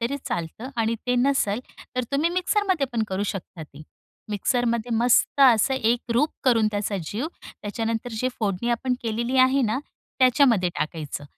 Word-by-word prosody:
तरी 240 Hz, +5 st, -1 dB
चालतं. 170 Hz, +9 st, -4 dB
आणि 225 Hz, 0 st, +1 dB
ते 250 Hz, -, +2 dB
नसेल 245 Hz, -5 st, +1 dB, 0.4 s
तर 250 Hz, -, +1 dB
तुम्ही 300 Hz, +5 st, +2 dB
मिक्सरमध्ये 365 Hz, -3 st, +1 dB
पण 230 Hz, -2 st, 0 dB
करू 190 Hz, +1 st, -2 dB
शकता 185 Hz, -3 st, -8 dB
ते. 150 Hz, -1 st, -12 dB, 0.5 s
मिक्सरमध्ये 235 Hz, +2 st, 0 dB
मस्त 245 Hz, +4 st, +3 dB
असं 260 Hz, 0 st, +5 dB
एक 240 Hz, 0 st, 0 dB
रूप 290 Hz, +7 st, +2 dB
करून 230 Hz, -4 st, +4 dB
त्याचा 205 Hz, 0 st, -1 dB
जीव, 225 Hz, -, -3 dB, 0.2 s
त्याच्यानंतर 225 Hz, +3 st, -4 dB
जे 255 Hz, -, +1 dB
फोडणी 205 Hz, +1 st, -1 dB
आपण 250 Hz, +2 st, 0 dB
केलेली 235 Hz, +3 st, -1 dB
आहे 260 Hz, +1 st, +4 dB
ना, 220 Hz, +1 st, 0 dB, 0.4 s
त्याच्यामध्ये 250 Hz, -7 st, +4 dB
टाकायचं. 155 Hz, -1 st, -4 dB
235 Hz, 155 wpm, -24 LUFS, 210-260 Hz, 0.5 s, असं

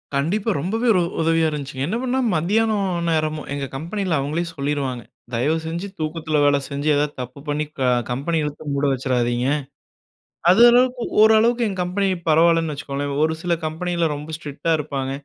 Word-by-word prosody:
கண்டிப்பா. 190 Hz, +11 st, 0 dB
ரொம்பவே 225 Hz, -, -1 dB
ஒரு 185 Hz, -, +3 dB, 0.2 s
உதவியா 165 Hz, 0 st, +2 dB
இருந்துச்சுங்க. 140 Hz, -3 st, -4 dB
என்ன 215 Hz, +7 st, -1 dB
பண்ணா 260 Hz, 0 st, 0 dB, 0.2 s
மத்தியானம் 205 Hz, +4 st, +1 dB, 0.2 s
நேரமும் 155 Hz, -2 st, -1 dB
எங்க 140 Hz, -1 st, -3 dB
கம்பெனியில, 175 Hz, +4 st, -2 dB
அவுங்களே 150 Hz, +5 st, -1 dB
சொல்லிருவாங்க. 140 Hz, -4 st, -2 dB, 0.3 s
தயவு 145 Hz, +8 st, +1 dB
செஞ்சு 170 Hz, +4 st, -4 dB
தூக்கத்தில 155 Hz, 0 st, -2 dB
வேலை 145 Hz, 0 st, +4 dB
செஞ்சு, 140 Hz, +1 st, -3 dB
எதாவது 145 Hz, +1 st, 0 dB
தப்பு 125 Hz, +3 st, -8 dB
பண்ணி 150 Hz, +1 st, -1 dB
க -, -, -3 dB, 0.3 s
கம்பெனி 140 Hz, +7 st, -1 dB
இழுத்து 150 Hz, 0 st, -5 dB
மூட 140 Hz, 0 st, -1 dB
வச்சுறாதீங்க. 125 Hz, -1 st, 0 dB, 1.0 s
அது 190 Hz, +6 st, +6 dB
அளவுக்கு, 245 Hz, 0 st, +3 dB, 0.2 s
ஓரளவுக்கு 225 Hz, +2 st, +5 dB
எங்க 190 Hz, -2 st, -4 dB
கம்பெனி 190 Hz, +3 st, 0 dB, 0.2 s
பரவாயில்லன்னு 165 Hz, 0 st, +4 dB
வச்சுக்கோங்களேன். 140 Hz, -1 st, -4 dB
ஒரு 160 Hz, 0 st, +2 dB
சில 175 Hz, -1 st, +1 dB
கம்பெனியில 170 Hz, +2 st, -1 dB
ரொம்ப 150 Hz, +2 st, -7 dB
ஸ்ட்ரிக்டா 155 Hz, +1 st, -2 dB
இருப்பாங்க. 140 Hz, -3 st, -3 dB
155 Hz, 155 wpm, -22 LUFS, 140-180 Hz, 1.0 s, அது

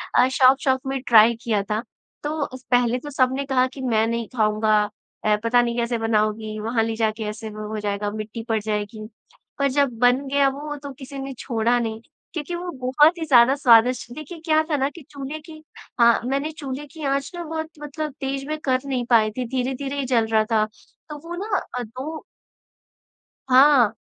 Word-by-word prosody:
अ, 250 Hz, -, +6 dB
शौक़-शौक़ 260 Hz, 0 st, +3 dB
में 270 Hz, -1 st, -2 dB
ट्राई 230 Hz, 0 st, +7 dB
किया 215 Hz, -4 st, +1 dB
था। 215 Hz, +1 st, 0 dB, 0.4 s
तो 295 Hz, 0 st, -1 dB, 0.3 s
पहले 245 Hz, 0 st, +3 dB
तो 290 Hz, -, -8 dB
सबने 265 Hz, 0 st, +1 dB
कहा 260 Hz, -2 st, +2 dB
कि 265 Hz, +1 st, -10 dB
मैं 225 Hz, -4 st, +2 dB
नहीं 230 Hz, -1 st, -2 dB
खाऊँगा, 215 Hz, -1 st, +2 dB, 0.5 s
अ, 210 Hz, 0 st, +4 dB
पता 240 Hz, +1 st, +4 dB
नहीं 235 Hz, -1 st, -1 dB
कैसे 235 Hz, 0 st, 0 dB
बनाओगी? 215 Hz, -1 st, -1 dB
वहाँ 225 Hz, +1 st, 0 dB
ले 225 Hz, 0 st, -2 dB
जाके 220 Hz, 0 st, -1 dB
ऐसे 220 Hz, +1 st, -7 dB
वो 215 Hz, 0 st, -7 dB
हो 215 Hz, 0 st, -3 dB
जाएगा, 205 Hz, 0 st, -2 dB
मिट्टी 215 Hz, +2 st, -6 dB
पड़ 220 Hz, -1 st, +2 dB
जाएगी। 215 Hz, +1 st, -3 dB, 0.5 s
पर 280 Hz, -, +3 dB
जब 275 Hz, -3 st, +1 dB
बन 250 Hz, +3 st, +3 dB
गया 280 Hz, 0 st, +3 dB
वो 295 Hz, +2 st, -6 dB
तो 285 Hz, -, -6 dB
किसी 270 Hz, +1 st, -9 dB
ने 270 Hz, 0 st, -5 dB
छोड़ा 235 Hz, -1 st, +1 dB
नहीं, 225 Hz, -1 st, -3 dB, 0.3 s
क्योंकि 330 Hz, +1 st, -4 dB
वो 350 Hz, +1 st, -5 dB
बहुत 295 Hz, +7 st, +4 dB
ही 325 Hz, -, -3 dB
ज़्यादा 260 Hz, -2 st, +6 dB
स्वादिष्ट 245 Hz, -2 st, +4 dB
देखिए 310 Hz, +3 st, -8 dB
क्या 315 Hz, -1 st, +4 dB
था 300 Hz, -, +1 dB
ना 270 Hz, 0 st, +1 dB
कि 335 Hz, -, -13 dB
चूल्हे 280 Hz, +2 st, -6 dB
की 310 Hz, 0 st, -13 dB, 0.4 s
हाँ, 235 Hz, -1 st, +6 dB
मैंने 275 Hz, +4 st, -1 dB
चूल्हे 290 Hz, -2 st, -6 dB
की 315 Hz, -, -9 dB
आँच 275 Hz, +2 st, -1 dB
ना 345 Hz, -, -5 dB
बहुत 320 Hz, 0 st, -4 dB
मतलब 295 Hz, 0 st, -5 dB
तेज़ 270 Hz, 0 st, -3 dB
में 310 Hz, 0 st, -2 dB
कर 255 Hz, -2 st, +2 dB
नहीं 255 Hz, -3 st, -2 dB
पाई 220 Hz, -3 st, +4 dB
थी, 250 Hz, +4 st, -4 dB
धीरे-धीरे 265 Hz, +3 st, -3 dB
ही 275 Hz, -, -1 dB
जल 240 Hz, -3 st, +2 dB
रहा 220 Hz, -1 st, +3 dB
था, 215 Hz, -1 st, +3 dB, 0.4 s
तो 300 Hz, -, -6 dB
वो 345 Hz, -, -5 dB
न 395 Hz, +2 st, -1 dB, 0.2 s
अ, 250 Hz, -, -2 dB
दो 265 Hz, +8 st, -7 dB, 1.3 s
हाँ, 255 Hz, -4 st, +6 dB
255 Hz, 195 wpm, -23 LUFS, 225-280 Hz, 1.3 s, ट्राई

